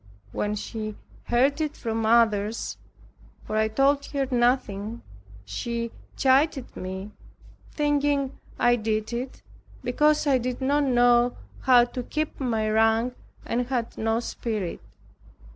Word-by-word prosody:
When 210 - -1
she 215 0 -5 0.3
heard 270 +5 +2
it 305 -1 -2
from 225 -1 -2
others 220 -2 +2 0.6
(for 215 - -5
I 220 0 +3
told 275 +5 +2
her 275 -2 -1
nothing) 240 -3 0 0.4
she 235 - -3 0.3
chided 270 0 +2
me 190 +2 -6 0.6
thinking 290 -2 0 0.2
I 240 0 +4
did 220 0 -2
it 250 +2 -5 0.4
because 300 0 +2
I 270 -3 +3
did 250 0 -3
not 285 +2 +2
know 245 -1 +4 0.2
how 250 -2 +6
to 250 +1 -5
keep 305 +5 -3
my 225 -5 0
rank 225 +3 +3 0.3
and 245 +1 -1
had 245 -3 -2
no 225 +1 0
spirit. 215 -6 -3
240 Hz, 125 wpm, -26 LUFS, 220-270 Hz, 0.6 s, how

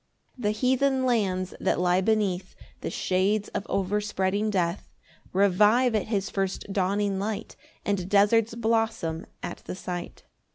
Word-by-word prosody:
5 - - -10
The 210 - +1
heathen 260 +4 +2
lands 190 -7 0
that - - +1
lie 180 +1 +3
beneath 200 -3 0 0.2
The - - -4
shades 195 +3 0
of - - -4
overspreading 200 +1 0
death, 180 -3 -1 0.4
Revive 210 +6 +4
at 215 - 0
his 200 -3 -1
first 195 -1 -2
dawning 200 +1 +1
light, 210 +1 -4 0.3
And 190 -3 -1
deserts 215 +3 +4
blossom 225 -8 0 0.2
at - - -4
the - - -4
sight. 180 -1 -6
200 Hz, 135 wpm, -27 LUFS, 185-220 Hz, 0.4 s, Revive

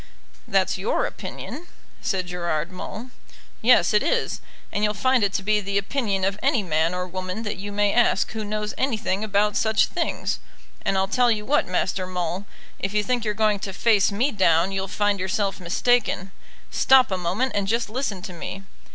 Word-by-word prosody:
"That's - - +1
your - - 0
opinion," 345 +3 -7 0.3
said 185 -1 -1
Gerard 170 -2 -2
Maule. 220 +6 -7 0.5
"Yes, 225 -6 +5
it 210 - +4
is; 320 - 0 0.3
and 205 - -1
you'll 210 0 +1
find 255 0 +2
it 200 - +2
to 195 - -1
be 210 +1 +2
the 200 0 -1
opinion 200 -2 -1
of 195 +1 -1
any 225 - +2
man 165 0 +1
or 180 0 -3
woman 185 +3 -4
that 210 -3 -3
you 205 +2 -6
may 205 0 +1
ask 240 -4 +3
who 220 -1 -4
knows 210 0 -3
anything 220 -6 0
about 210 0 +1
such 220 -1 +3
things. - - -2 0.4
And 195 - +1
I'll 190 0 +2
tell 245 +4 +3
you 210 -2 0
what, 295 +5 +2
Master 185 +1 -1
Maule, 180 +2 -3 0.3
if 195 +2 -3
you 210 - +3
think 245 0 0
you're 210 -2 -1
going 215 -2 +2
to 195 -1 -5
face 210 0 +3
me 240 +8 +1
down 185 -3 +3
you'll 195 0 -2
find 205 0 0
yourself 195 +2 -1
mistaken. 195 +1 +1 0.4
Stop 265 -4 +5
a - - +2
moment, 190 +9 -1
and 200 -1 0
just 230 +3 +1
listen 215 -5 -3
to 185 - -6
me. 190 +3 -6
205 Hz, 190 wpm, -24 LUFS, 190-220 Hz, 0.5 s, Yes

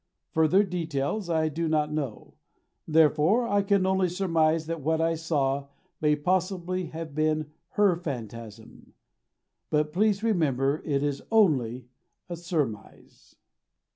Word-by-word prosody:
Further 160 +5 +4
details 170 0 -3
I 160 -1 +2
do 165 +2 -2
not 150 -1 0
know, 140 -8 -5 0.5
therefore 160 - +3
I 205 -2 +2
can 200 -1 +2
only 190 -1 +2
surmise 165 -3 +1
that 165 -1 -4
what 160 +3 0
I 165 0 +2
saw 140 -4 -1 0.3
may 150 -1 +3
possibly 185 +2 -1
have 160 -1 -7
been 155 0 0 0.2
HER 205 -4 +4
phantasm 115 - -8 0.7
but 150 0 0
please 205 +2 +2
remember, 150 - +1
it 140 -2 0
is 145 -1 -2
ONLY 130 - +2 0.4
a 175 - -3
surmise. 150 - -5
160 Hz, 125 wpm, -27 LUFS, 145-180 Hz, 0.7 s, Further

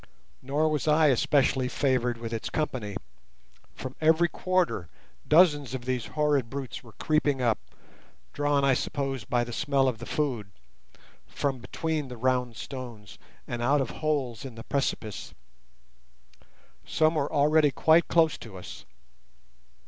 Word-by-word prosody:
Nor 145 +4 +1
was 155 -1 -1
I 155 0 +5
especially 130 0 +2
favoured 125 -2 0
with 115 0 -6
its 115 - -3
company. 125 -10 -3 0.8
From 130 0 -7
every 160 +2 +4
quarter 180 - 0 0.4
dozens 150 -5 +4
of 120 -2 -6
these 130 -2 -2
horrid 145 -5 +2
brutes 130 -4 -6
were 115 -3 -15
creeping 150 -1 +1
up, 120 -3 +2 0.7
drawn, 145 -1 +1
I 135 - +5
suppose, 135 -3 -2
by 120 -1 +1
the 120 0 -6
smell 140 0 +1
of 120 -4 -1
the - - -8
food, 125 -9 -2 0.8
from 135 -3 -2
between 155 +3 -3
the 125 -1 -8
round 125 -1 0
stones 120 -7 -8 0.3
and 120 0 -4
out 140 +5 +3
of 135 - -1
holes 140 -7 -1
in 130 -4 -8
the 115 - -9
precipice. 120 -6 -3 1.5
Some 155 0 +2
were 145 -3 -1
already 150 +1 +4
quite 160 +5 +4
close 160 -2 +3
to 105 -5 -10
us. 90 - -10
135 Hz, 140 wpm, -27 LUFS, 120-150 Hz, 1.5 s, I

